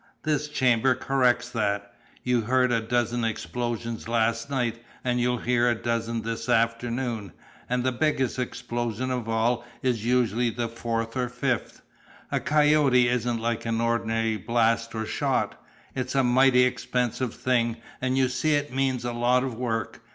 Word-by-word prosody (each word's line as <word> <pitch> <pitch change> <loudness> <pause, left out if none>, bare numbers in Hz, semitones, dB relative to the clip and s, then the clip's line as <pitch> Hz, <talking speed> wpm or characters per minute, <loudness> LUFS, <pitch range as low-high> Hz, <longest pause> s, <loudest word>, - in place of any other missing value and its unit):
This 150 -1 0
chamber 130 -3 +2
corrects 125 -2 +1
that. 100 -3 -1 0.3
You 125 -1 +2
heard 125 +2 +2
a 115 -2 +2
dozen 120 +1 0
explosions 115 0 -3
last 115 +1 0
night, 120 -4 -1 0.2
and 125 -1 0
you'll 125 0 +1
hear 120 0 +2
a 120 - +2
dozen 115 0 -2
this 115 0 -4
afternoon, 115 - 0 0.4
and 125 0 0
the 130 - +1
biggest 130 -1 0
explosion 120 -1 -3
of 125 -3 -3
all 115 +2 +1 0.2
is 120 -4 0
usually 120 -1 +2
the 115 +1 -3
fourth 115 0 -3
or 125 -1 -1
fifth. 125 -1 -2 0.5
A - - +1
'coyote' 150 -2 +3
isn't 120 -1 0
like 115 0 -2
an 115 0 0
ordinary 115 -1 0
blast 115 +2 +1
or 110 0 -2
shot. - - -1 0.3
It's 130 0 -3
a 135 - +4
mighty 125 +1 +5
expensive 125 -1 -1
thing, 120 -2 +1 0.2
and 130 0 0
you 130 -1 +4
see 150 +4 +1
it 145 -2 -2
means 130 -2 0
a 120 - -2
lot 120 +2 +2
of 130 -2 -3
work. 115 -3 -3
120 Hz, 160 wpm, -26 LUFS, 115-125 Hz, 0.5 s, mighty